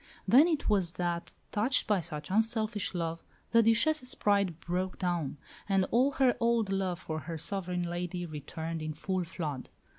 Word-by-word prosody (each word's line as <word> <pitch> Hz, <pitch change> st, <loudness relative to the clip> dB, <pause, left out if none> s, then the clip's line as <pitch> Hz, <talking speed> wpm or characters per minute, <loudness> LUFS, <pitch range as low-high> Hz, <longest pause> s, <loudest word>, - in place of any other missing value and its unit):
Then 280 Hz, +7 st, +7 dB
it 315 Hz, -4 st, 0 dB
was 190 Hz, -5 st, +2 dB
that, 175 Hz, -1 st, -2 dB, 0.2 s
touched 230 Hz, +6 st, +2 dB
by 205 Hz, -4 st, +2 dB
such 155 Hz, -1 st, -6 dB
unselfish 220 Hz, -2 st, 0 dB
love, 165 Hz, -1 st, -2 dB, 0.3 s
the 230 Hz, -, +6 dB
Duchesse's 255 Hz, +5 st, +2 dB
pride 200 Hz, -5 st, +1 dB
broke 180 Hz, +2 st, -2 dB
down, 175 Hz, -6 st, -1 dB, 0.3 s
and 195 Hz, -1 st, +3 dB
all 260 Hz, +4 st, +3 dB
her 260 Hz, -3 st, +3 dB
old 230 Hz, -3 st, +2 dB
love 190 Hz, -2 st, 0 dB
for 155 Hz, -3 st, -4 dB
her 160 Hz, +3 st, -5 dB
sovereign 180 Hz, +1 st, -2 dB
lady 175 Hz, +1 st, -3 dB
returned 160 Hz, +1 st, -5 dB
in 155 Hz, 0 st, -3 dB
full 185 Hz, +4 st, -2 dB
flood. 155 Hz, -5 st, -5 dB
185 Hz, 160 wpm, -31 LUFS, 170-220 Hz, 0.3 s, Then